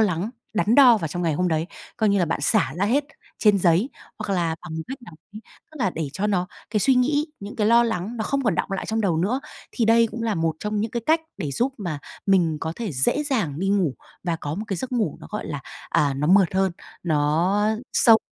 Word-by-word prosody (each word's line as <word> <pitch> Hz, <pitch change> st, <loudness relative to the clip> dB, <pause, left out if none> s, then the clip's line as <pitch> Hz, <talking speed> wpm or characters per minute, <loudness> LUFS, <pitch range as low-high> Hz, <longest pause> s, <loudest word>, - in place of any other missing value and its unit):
lắng, 195 Hz, 0 st, +1 dB, 0.2 s
đắn 215 Hz, +2 st, +2 dB
đo 250 Hz, -6 st, +7 dB
vào 165 Hz, -, -3 dB
trong 175 Hz, +4 st, -4 dB
ngày 165 Hz, -3 st, +1 dB
hôm 180 Hz, +4 st, +1 dB
đấy, 160 Hz, 0 st, 0 dB, 0.3 s
coi 220 Hz, -2 st, +2 dB
như 200 Hz, -1 st, +3 dB
là 175 Hz, -, +3 dB
bạn 165 Hz, -2 st, -2 dB
xả 135 Hz, -, +2 dB
ra 190 Hz, -, +1 dB
hết 275 Hz, +7 st, +2 dB, 0.3 s
trên 210 Hz, -2 st, +4 dB
giấy, 180 Hz, -, +3 dB, 0.3 s
hoặc 210 Hz, -2 st, -2 dB
là 165 Hz, -3 st, 0 dB
bằng 165 Hz, -2 st, -7 dB
một 160 Hz, -, -3 dB
cách 265 Hz, +1 st, -5 dB
nào 195 Hz, -9 st, -12 dB, 0.2 s
đấy, 215 Hz, -, -8 dB, 0.3 s
tức -, -, -12 dB
là 195 Hz, -7 st, +1 dB
để 160 Hz, -4 st, -4 dB
cho 205 Hz, -, -1 dB
nó 185 Hz, -3 st, 0 dB, 0.2 s
cái 210 Hz, -1 st, +1 dB
suy 265 Hz, +7 st, +4 dB
nghĩ, 290 Hz, +4 st, +2 dB
những 200 Hz, +1 st, -8 dB
cái 210 Hz, -2 st, +1 dB
lo 235 Hz, +1 st, +5 dB
lắng 225 Hz, +1 st, -3 dB
nó 220 Hz, -, -2 dB
không 275 Hz, -1 st, -1 dB
còn 210 Hz, -7 st, +2 dB
đọng 195 Hz, -, -2 dB
lại 195 Hz, -, -3 dB
trong 220 Hz, 0 st, -1 dB
đầu 185 Hz, -7 st, +1 dB
nữa. 210 Hz, +11 st, 0 dB, 0.3 s
Thì 235 Hz, -, 0 dB
đây 230 Hz, +1 st, +5 dB
cũng 235 Hz, -, -5 dB
là 225 Hz, -2 st, 0 dB
một 165 Hz, -2 st, 0 dB
trong 210 Hz, 0 st, -2 dB
những 220 Hz, -, -2 dB
cái 235 Hz, +1 st, -3 dB
cách 320 Hz, +1 st, +4 dB, 0.2 s
để 150 Hz, -, -3 dB
giúp 255 Hz, -, 0 dB
mà 170 Hz, -8 st, -3 dB, 0.3 s
mình 175 Hz, -6 st, +3 dB
có 160 Hz, -, -3 dB
thể 220 Hz, -8 st, -4 dB
dễ 130 Hz, -, +2 dB
dàng 210 Hz, -, -1 dB
đi 195 Hz, -, 0 dB
ngủ 190 Hz, -9 st, +1 dB, 0.3 s
và 170 Hz, -2 st, 0 dB
có 145 Hz, -1 st, -4 dB
một 210 Hz, -, -4 dB
cái 195 Hz, -, -1 dB
giấc 255 Hz, +8 st, -5 dB
ngủ 230 Hz, -4 st, 0 dB
nó, -, -, -10 dB
gọi 210 Hz, -, -4 dB
là, 145 Hz, -1 st, -4 dB, 0.3 s
à, 145 Hz, -4 st, +2 dB
nó 140 Hz, +2 st, -1 dB
mượt 190 Hz, +1 st, +4 dB
hơn, 190 Hz, -1 st, +2 dB, 0.3 s
nó 165 Hz, +5 st, +2 dB, 0.3 s
sâu 225 Hz, -2 st, +6 dB
195 Hz, 255 wpm, -23 LUFS, 165-225 Hz, 0.3 s, đo